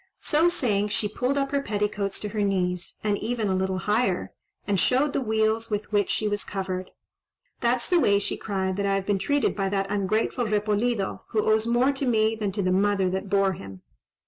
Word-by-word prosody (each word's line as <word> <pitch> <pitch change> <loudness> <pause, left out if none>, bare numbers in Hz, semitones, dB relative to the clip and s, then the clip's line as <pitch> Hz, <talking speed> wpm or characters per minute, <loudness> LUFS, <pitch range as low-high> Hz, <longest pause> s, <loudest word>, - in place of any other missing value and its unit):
So 320 +3 +3
saying, 210 -11 0
she 210 0 -1
pulled 250 +6 -1
up 275 -1 0
her 280 -1 +1
petticoats 205 -3 -2
to 210 - -3
her 210 0 -2
knees, 180 -3 -1
and 205 -1 0
even 225 -2 -1
a 190 - +1
little 190 0 0
higher, 210 0 0 0.3
and 200 -2 +1
showed 280 +8 +2
the - - 0
wheals 220 0 0
with 210 0 -3
which 205 -1 +2
she 215 - 0
was 205 -1 -1
covered. 185 -2 -4 0.7
"That's 240 0 +1
the 355 - +3
way," 200 -10 +4
she 200 - -2
cried, 190 -2 -2
"that 200 - 0
I 195 - +2
have 195 -1 -2
been 200 -1 +1
treated 285 +8 +1
by 195 -2 -1
that 195 0 -1
ungrateful 215 +4 0
Repolido, 210 0 0
who 215 -2 0
owes 220 +1 +3
more 245 +3 +3
to 275 -1 -2
me 220 -2 +2
than 210 -3 -2
to 200 -1 -1
the 185 - +1
mother 195 -1 +2
that 190 +1 -3
bore 195 -1 +3
him. 95 - -10
210 Hz, 210 wpm, -26 LUFS, 195-225 Hz, 0.7 s, way